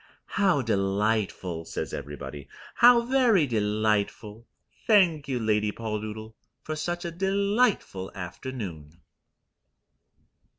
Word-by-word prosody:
"How 190 -9 +2
delightful," 100 -4 -1
says - - -5
everybody. 70 0 -7 0.3
"How 240 0 +7
very 235 - +3
delightful. 105 -1 -1 0.4
Thank 175 -9 +4
you, 130 -2 -1
Lady 105 -1 +1
Poldoodle, 110 0 -5 0.3
for 155 - -4
such 175 +3 -3
a 170 - -3
delightful 195 - 0
afternoon." 90 - -7
110 Hz, 90 wpm, -27 LUFS, -, 0.4 s, How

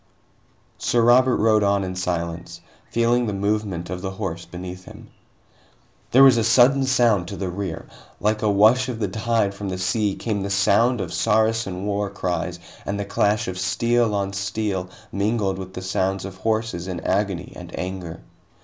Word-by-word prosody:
Sir 120 -1 +2
Robert 125 +2 +5
rode 110 0 +3
on 100 -1 +2
in 95 0 -4
silence, 85 -2 -4 0.3
feeling 120 +1 +2
the 105 - -2
movement 100 -3 -2
of 90 0 -4
the 95 - -3
horse 95 -4 -5
beneath 90 +1 -8
him. - - -13 1.0
There 135 +2 +6
was 130 -3 +7
a 115 - +2
sudden 130 +4 +5
sound 120 -8 +3
to 100 - -6
the 95 -2 -3
rear. 95 -2 -5 0.3
Like 105 0 0
a 110 - +2
wash 110 +6 +4
of 120 - -3
the 105 -2 -1
tide 110 +1 0
from 100 0 -5
the 95 - -3
sea 100 +2 0
came 105 -3 -2
the 100 - -3
sound 100 +4 +3
of 90 -2 -5
Saracen 110 -3 +1
war 105 0 -1
cries 90 -2 -3 0.3
and 100 +1 -3
the 100 - -2
clash 105 +1 +1
of 95 0 -4
steel 115 +2 +1
on 100 -1 -2
steel 100 -1 -2 0.2
mingled 100 -1 0
with 95 0 -8
the 95 - -6
sounds 95 +1 -1
of 95 -1 -8
horses 110 -3 -2
in 90 -2 -4
agony 95 -1 -1
and - - -10
anger. 90 -3 -5
100 Hz, 175 wpm, -23 LUFS, 95-110 Hz, 1.0 s, was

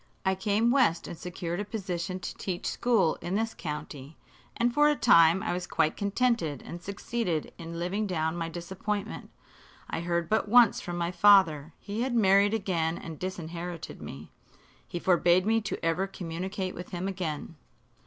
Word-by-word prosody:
I 190 - +3
came 205 +5 +1
west 245 -11 +2
and - - -6
secured 175 +1 -5
a - - -1
position 185 -4 -4
to - - -5
teach 180 -3 -4
school 220 -9 +2
in 180 +2 -3
this 225 +1 0
county, 150 -2 -7 0.4
and 235 +1 +2
for 295 +2 +5
a 295 - +2
time 170 - +5
I - - -1
was 180 0 -4
quite 155 - +1
contented 200 - 0
and 175 - -7
succeeded 200 -4 -3
in 165 0 -7
living 190 +5 -1
down 160 -3 -1
my 165 -1 -3
disappointment. 190 +5 -4 0.6
I 165 - -3
heard 170 -1 -1
but 220 +2 +1
once 240 -1 +6
from 175 -2 -5
my 170 0 -1
father. 175 -7 +5
He 210 +2 -5
had 250 -1 -1
married 200 -1 +4
again 170 -6 -1
and 160 -2 -8
disinherited 175 -2 -6
me. 70 +3 -9 0.6
He - - -5
forbade 175 +1 +3
me 225 +1 +2
to 205 - -3
ever 170 +4 +1
communicate 185 +1 -4
with 180 - -8
him 180 0 -3
again. 170 -5 -4
180 Hz, 170 wpm, -28 LUFS, 170-205 Hz, 0.6 s, once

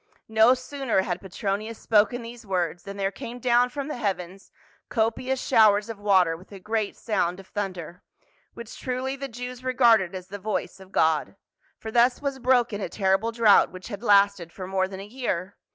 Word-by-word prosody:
No 220 +3 +5
sooner 255 -6 -1
had 175 -2 -3
Petronius 205 +3 -4
spoken 225 +3 +2
these 235 +1 -10
words, 180 -4 -2
than 200 0 -7
there 195 0 -1
came 240 +2 -8
down 245 0 +3
from 280 +2 -5
the 300 - -4
heavens 195 -3 -4 0.4
copious 250 +3 0
showers 210 -2 +4
of 225 -3 -6
water 190 -5 +3
with 180 +5 -16
a 200 - -9
great 215 +1 -2
sound 180 -5 -1
of 195 - -12
thunder; 185 -4 -5 0.5
which 235 -1 -9
truly 260 +1 -3
the 275 0 -5
Jews 250 +1 -8
regarded 235 -7 +3
as 185 0 -8
the 205 +2 -7
voice 205 -1 -3
of 190 0 -15
God, 160 +1 +1 0.4
for 220 - -7
thus 240 +2 +3
was 280 -2 -3
broken 245 -4 +2
a - - -3
terrible 195 +3 +1
drought 225 -3 +5
v/hich 185 +3 -10
had 205 -3 -6
lasted 200 -5 +3
for 185 - -7
more 190 0 0
than 190 0 -8
a - - -8
year. 205 -5 -4
210 Hz, 185 wpm, -25 LUFS, 190-240 Hz, 0.5 s, No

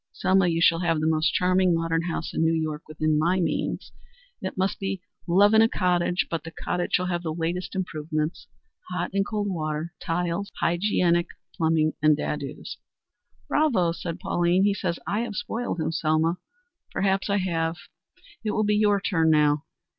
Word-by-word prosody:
Selma, 190 -1 +2
you 165 -1 +1
shall 165 0 +4
have 165 -3 +1
the 155 - -1
most 160 0 +2
charming 185 -1 +3
modern 165 0 0
house 165 -1 -4
in - - -1
New 165 0 +3
York 155 -1 -3
within 155 0 0
my 175 +4 +2
means. 175 - -2 0.5
It 190 - -5
must 190 +1 0
be 195 -1 -2 0.3
love 200 +5 +5
in 220 - +7
a 225 - +5
cottage, 180 -2 +1
but 165 - -3
the 165 - -7
cottage 175 +2 -3
shall 180 - +1
have 175 -1 -1
the 165 -2 -3
latest 170 +4 -3
improvements 155 -3 -3 0.4
hot 180 -1 -3
and 195 0 +2
cold 205 0 -2
water, 160 -2 -3
tiles, 175 +3 -2
hygienic 175 -1 +2 0.3
plumbing 160 -1 +2
and 155 -1 +5
dados." 145 -1 -5 0.7
"Bravo!" 235 - +2
said 170 +1 -5
Pauline. 175 0 +2
"He 205 0 +3
says 180 -4 -2
I 205 - -1
have 230 -3 -3
spoiled 230 -2 -3
him, 160 0 -1
Selma. 160 +2 +1 0.5
Perhaps 195 +1 0
I 200 - +2
have. 165 -3 -1 0.7
It 215 - -1
will 215 - +1
be 210 0 +2
your 205 -1 +3
turn 165 -5 +1
now. 150 -1 +3
175 Hz, 175 wpm, -25 LUFS, 160-190 Hz, 0.7 s, in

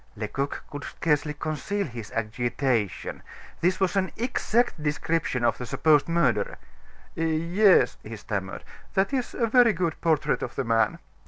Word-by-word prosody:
Lecoq 115 +6 -3
could 145 -1 -6
scarcely 150 -1 0
conceal 155 +7 -2
his 115 -5 -8
agitation. 115 -1 -1 0.4
This 180 +2 +1
was 190 0 +1
an 190 -1 +1
exact 240 -4 0
description 150 -4 0
of 115 - +1
the 125 - -4
supposed 150 +2 +3
murderer. 125 -12 +1 0.6
"Yes," 170 +5 +3
he - - -8
stammered, - - -5 0.3
"that 195 +7 +2
is 255 -3 -2
a 235 - +1
very 235 0 +5
good 170 -3 -2
portrait 150 -2 +1
of - - -5
the 135 - -1
man." 115 -1 +2
155 Hz, 145 wpm, -26 LUFS, 125-190 Hz, 0.6 s, very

